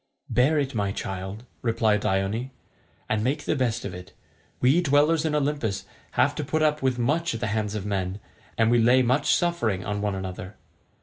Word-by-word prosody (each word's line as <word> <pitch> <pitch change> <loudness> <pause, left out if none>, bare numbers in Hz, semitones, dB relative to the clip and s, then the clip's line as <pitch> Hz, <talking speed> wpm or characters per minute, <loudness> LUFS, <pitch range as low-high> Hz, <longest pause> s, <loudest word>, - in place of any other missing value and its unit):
"Bear 135 +6 +3
it, 140 -2 0
my 100 -3 0
child," 95 +3 -5 0.2
replied 110 -3 +2
Dione, 100 +6 -1 0.6
"and 110 -1 0
make 145 +4 -1
the - - +1
best 120 -3 -1
of - - -5
it. 90 +1 -10 0.5
We 135 +8 +4
dwellers 150 +1 +3
in 155 -1 0
Olympus 145 -8 -1 0.3
have - - +3
to - - -1
put 155 0 0
up 150 0 +2
with 130 -2 +1
much 150 +4 0
at - - -4
the 120 - -1
hands 105 -1 -1
of 105 -2 -4
men, 95 -1 -2 0.4
and 115 0 +3
we 120 - +4
lay 125 +3 +5
much 130 +4 +3
suffering 120 - 0
on 105 0 -2
one 105 -1 -1
another. 95 0 -6
115 Hz, 190 wpm, -25 LUFS, 100-145 Hz, 0.6 s, lay